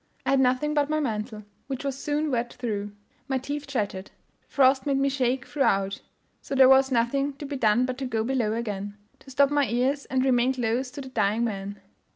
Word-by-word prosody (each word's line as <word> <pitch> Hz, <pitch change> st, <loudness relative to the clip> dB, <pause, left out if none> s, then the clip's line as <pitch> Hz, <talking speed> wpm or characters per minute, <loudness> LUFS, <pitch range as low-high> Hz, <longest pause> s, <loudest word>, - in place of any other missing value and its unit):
I -, -, +1 dB
had 275 Hz, -, +4 dB
nothing 260 Hz, +4 st, +2 dB
but 290 Hz, -1 st, +1 dB
my 310 Hz, 0 st, +1 dB
mantle, 215 Hz, -5 st, -3 dB, 0.2 s
which 270 Hz, -1 st, -4 dB
was 275 Hz, -2 st, -2 dB
soon 295 Hz, +2 st, -1 dB
wet 240 Hz, -1 st, -1 dB
through; 205 Hz, -4 st, -4 dB, 0.4 s
my 265 Hz, -, 0 dB
teeth 285 Hz, +3 st, -5 dB
chattered; 205 Hz, -7 st, -3 dB
the -, -, -39 dB
frost 265 Hz, +1 st, +3 dB
made 275 Hz, -1 st, +2 dB
me 275 Hz, 0 st, +2 dB
shake 255 Hz, -2 st, 0 dB
throughout; 195 Hz, -8 st, 0 dB, 0.4 s
so 275 Hz, -, -5 dB
there 265 Hz, -1 st, +7 dB
was 265 Hz, 0 st, +5 dB
nothing 275 Hz, +4 st, +1 dB
to 280 Hz, +2 st, -8 dB
be 285 Hz, 0 st, -5 dB
done 240 Hz, -1 st, +3 dB
but 255 Hz, 0 st, -4 dB
to 270 Hz, -, -3 dB
go 225 Hz, -3 st, -1 dB
below 235 Hz, -3 st, 0 dB
again 205 Hz, -3 st, -4 dB, 0.2 s
to -, -, -16 dB
stop 280 Hz, +1 st, +3 dB
my 290 Hz, -2 st, +2 dB
ears, 260 Hz, +4 st, 0 dB
and 260 Hz, 0 st, 0 dB
remain 255 Hz, 0 st, +2 dB
close 245 Hz, +1 st, -1 dB
to 280 Hz, -, -8 dB
the 265 Hz, -, -8 dB
dying 215 Hz, -2 st, +1 dB
man. 200 Hz, -2 st, -4 dB
255 Hz, 210 wpm, -26 LUFS, 225-275 Hz, 0.4 s, there